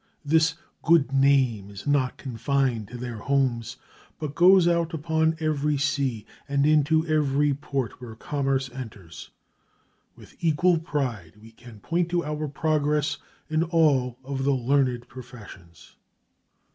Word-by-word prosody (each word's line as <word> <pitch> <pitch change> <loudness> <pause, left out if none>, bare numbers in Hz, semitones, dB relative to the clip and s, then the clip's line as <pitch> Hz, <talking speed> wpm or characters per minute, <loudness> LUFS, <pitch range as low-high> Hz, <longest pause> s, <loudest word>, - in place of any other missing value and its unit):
This 160 +1 +3 0.3
"good 160 -5 +3
name" 135 -7 +2
is 100 -1 -10
not 140 -3 +1
confined 125 -2 -1
to 125 - -9
their 120 -2 -6
homes, 125 -2 -1 0.4
but 150 -2 -5
goes 180 +1 +6
out 170 -1 +1
upon 160 +1 0
every 150 -2 0
sea 140 -5 -1 0.2
and 140 0 +2
into 155 +1 +3
every 150 -2 +1
port 135 -4 -4
where 115 -3 -9
commerce 135 +1 -1
enters. 105 -10 -10 0.9
With - - -18
equal 170 +2 +3
pride 125 - -3
we 110 +1 -15
can 115 -2 -15
point 170 +5 -1
to 175 -2 -1
our 150 0 -3
progress 150 0 0 0.3
in 155 0 0
all 150 -7 +2
of 135 0 -4
the 140 0 +2
learned 125 -1 0
professions. 105 - -13
140 Hz, 135 wpm, -25 LUFS, 125-155 Hz, 0.9 s, goes